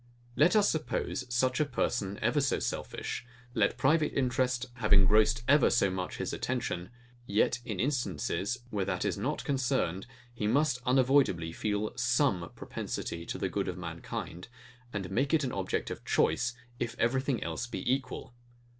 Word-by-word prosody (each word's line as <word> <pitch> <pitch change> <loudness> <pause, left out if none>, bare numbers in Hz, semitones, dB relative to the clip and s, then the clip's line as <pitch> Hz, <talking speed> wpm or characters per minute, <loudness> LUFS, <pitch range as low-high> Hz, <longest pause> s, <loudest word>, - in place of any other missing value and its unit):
Let 155 - +5
us 205 -1 +5
suppose 150 -4 -1
such 125 +1 +2
a - - +5
person 100 -7 -1
ever 120 +6 +3
so 135 - +1
selfish; - - -3 0.3
let - - +2
private 150 +3 +3
interest 125 -1 +1
have 125 - -1
ingrossed 105 +4 +5
ever 145 -1 +6
so 100 -5 +3
much 90 0 -4
his - - -3
attention; 90 +2 -2 0.4
yet 105 +4 +2
in 105 -7 -4
instances, 120 - -1
where 100 -2 0
that 90 -2 -1
is - - +1
not - - -2
concerned, 125 - 0 0.3
he 105 -3 -2
must 135 +2 +2
unavoidably 125 -10 +3
feel 105 +4 -2
SOME 120 - +1
propensity 85 0 -5
to - - -3
the - - -1
good - - -2
of - - -3
mankind, 85 +2 -6 0.4
and 95 -5 -4
make 135 +6 +2
it 155 - +2
an 130 - -1
object 95 -1 -2
of - - -6
choice, 125 0 +1 0.2
if 120 -1 -2
everything 130 +2 +1
else 125 - -3
be 120 - -5
equal. 130 -2 -4
120 Hz, 160 wpm, -30 LUFS, 100-135 Hz, 0.4 s, ever